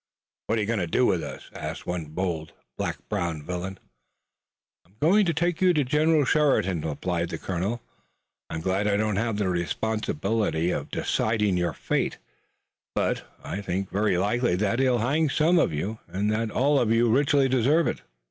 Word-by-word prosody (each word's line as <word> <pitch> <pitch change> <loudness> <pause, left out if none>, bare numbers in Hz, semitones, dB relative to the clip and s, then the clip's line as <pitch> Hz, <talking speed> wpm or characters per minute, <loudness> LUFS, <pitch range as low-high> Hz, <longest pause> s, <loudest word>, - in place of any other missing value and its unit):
"What 115 - +1
are - - +1
you 105 - -1
going 115 -2 0
to 90 - -1
do 125 +9 +2
with 90 - +2
us?" 70 -3 -8
asked - - -6
one 90 -2 -3
bold, 80 0 -3 0.2
black - - -2
browed 80 -3 -2
villain. 90 +3 -4 1.1
"I'm 90 +4 -29
going 190 +6 +4
to 170 - +2
take 175 +1 0
you 180 -2 +4
to 150 - +3
General 150 +2 +3
Sheridan," 130 - +2
replied 85 +2 -2
the - - -4
colonel. 95 +6 -3 0.7
"I'm 80 - -4
glad 95 +4 0
I 100 -1 +2
don't 105 -1 0
have 115 0 0
the 105 -2 0
responsibility 95 0 -1
of - - -3
deciding 105 -3 0
your 85 -3 0
fate, - - -1 0.8
but - - 0 0.2
I 100 - -4
think 95 0 -3
it - - -22
very 100 -2 +2
likely 105 +2 +1
that 105 +5 0
he'll 130 -2 +3
hang 140 +7 +1
some 165 +5 +3
of - - +2
you, 100 +9 -3
and 100 +3 -1
that 110 +1 0
all 140 +6 +2
of 115 -3 +1
you 115 +1 +4
richly 140 +3 +3
deserve 135 +6 +3
it." - - -2
105 Hz, 185 wpm, -26 LUFS, 90-130 Hz, 1.1 s, going